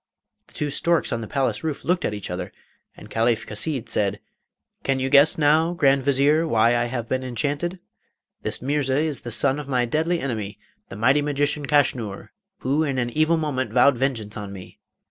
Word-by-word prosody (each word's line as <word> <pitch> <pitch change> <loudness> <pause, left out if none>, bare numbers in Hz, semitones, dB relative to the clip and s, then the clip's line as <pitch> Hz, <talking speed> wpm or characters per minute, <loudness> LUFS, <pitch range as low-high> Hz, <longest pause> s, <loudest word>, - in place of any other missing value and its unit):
The - - -21
two 150 -1 -2
storks 170 -2 +1
on 115 - -2
the 110 - -6
palace 135 +5 -1
roof 155 -5 -4
looked 180 +3 +1
at - - -1
each 100 -3 -6
other, 90 0 -5 0.5
and - - -12
Caliph 115 0 0
Chasid 125 +3 -4
said, 105 -3 0 0.6
'Can 135 -1 0
you 130 0 -2
guess 145 +2 +6
now, 160 +3 +3
Grand 140 -5 +3
Vizier, 140 +4 +2
why 115 -3 +3
I 120 0 +1
have 120 -1 -4
been 130 +1 -1
enchanted? 145 +8 -2 0.6
This - - -3
Mirza 135 -1 0
is 155 -2 -1
the 120 - -7
son 135 +4 +2
of 145 - -7
my 125 -3 +1
deadly 160 +7 0
enemy, 110 -8 -4 0.3
the - - -8
mighty 130 +7 +3
magician 145 0 -1
Kaschnur, 125 -8 0 0.3
who 140 +4 +1
in 140 -4 -1
an 120 -1 -1
evil 155 +4 +2
moment 130 -7 -2
vowed 130 +2 +5
vengeance 115 -5 -2
on 105 -2 -6
me. 95 -2 -11
135 Hz, 190 wpm, -23 LUFS, 115-150 Hz, 0.6 s, guess